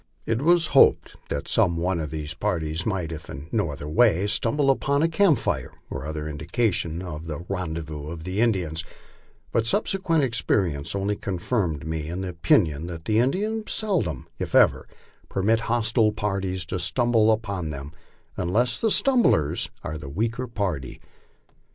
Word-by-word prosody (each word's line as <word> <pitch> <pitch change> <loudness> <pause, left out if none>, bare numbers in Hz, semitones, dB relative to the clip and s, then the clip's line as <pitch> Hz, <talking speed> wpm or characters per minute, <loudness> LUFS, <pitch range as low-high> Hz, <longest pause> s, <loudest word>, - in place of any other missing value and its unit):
It 115 +2 0
was 170 +2 +4
hoped 135 - +5
that 70 - -3
some 85 -2 +2
one 90 +1 0
of 75 -2 -3
these 75 0 -5
parties 80 +1 -2
might, 90 -6 -1
if 80 -1 -8
in 70 +4 -8
ho 105 -7 +1
other 70 0 -6
way, 100 +1 +3
stumble 135 +7 +2
upon 140 +2 +1
a - - +4
camp 165 -2 +4
fire - - -2 0.2
or 70 +2 -5
other 75 -1 -4
indication 85 +2 -1
of 80 -2 -7
the 80 +2 -5
rendezvous 80 -5 -4
of 80 0 -7
the 95 +4 -2
Indians; 90 -9 0 0.7
but 115 -1 +1
subsequent 185 - +1
experience 95 - 0
only 100 +1 0
confirmed 90 - -2
me 80 -1 -3
in 90 +3 -4
the 95 - -3
opinion 80 -2 +2
that 85 -2 -8
Indians 190 - +1
seldom, 160 - -1
if - - -3
ever, - - +4 0.4
permit 105 +4 +2
hostile 115 -1 +3
parties 95 -4 -2
to 90 +3 -3
stumble 115 +3 +3
upon 100 -7 -2
them 70 -1 -6 0.4
unless 110 +7 0
the 225 - +2
stumblers 235 - +2
are 80 +1 -4
the 70 -3 -8
weaker 115 - -2
par 100 - -1
ty. 65 - -9
95 Hz, 160 wpm, -25 LUFS, 80-115 Hz, 0.7 s, hoped